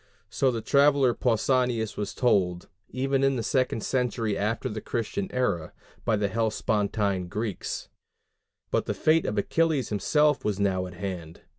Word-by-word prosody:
So 135 - +2
the 115 -3 -2
traveller 140 -3 +4
Pausanias 120 -1 +1
was 105 - -4
told, 90 -8 +1 0.2
even 135 +1 0
in 135 0 +3
the 115 - -2
second 130 -2 0
century 120 -5 0
after 105 +3 -1
the 110 0 -5
Christian 130 - -3
era, 100 -11 -1 0.3
by 115 - +2
the 105 -1 0
Hellespontine 105 -3 0
Greeks. 105 +2 -4 0.8
But - - 0
the - - -1
fate 160 +1 +3
of 105 - -2
Achilles 155 +4 +1
himself 150 +8 +2
was 105 -2 -1
now 95 -2 +1
at 90 - -11
hand. 90 -4 -6
110 Hz, 150 wpm, -27 LUFS, 100-130 Hz, 0.8 s, traveller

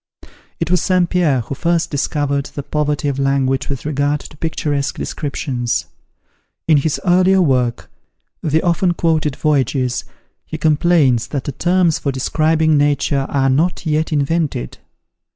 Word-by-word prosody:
It 165 +1 -2
was 180 - +3
St. 185 -2 +2
Pierre 165 -8 +1
who 120 +4 -6
first 170 +4 0
discovered 145 -1 -1
the 140 - -7
poverty 150 0 -1
of 140 -1 -2
language 135 -1 0
with 140 -2 -5
regard 145 0 0
to - - -13
picturesque 145 -3 -2
descriptions. 125 -5 -3 0.8
In 155 -2 +5
his 145 +1 0
earliest 185 +1 +4
work, 125 -5 0 0.5
the 160 +1 +1
often 175 0 +1
quoted 155 -5 0
"Voyages," 135 -4 0 0.4
he 155 - -6
complains, 155 -5 +2
that 140 -3 -3
the - - -4
terms 175 +2 +1
for 140 - -1
describing 155 +3 +1
nature 145 -1 +1
are 135 -1 +1
not 165 +7 0
yet 155 +1 0
invented. 145 - -1
150 Hz, 140 wpm, -18 LUFS, 135-165 Hz, 0.8 s, In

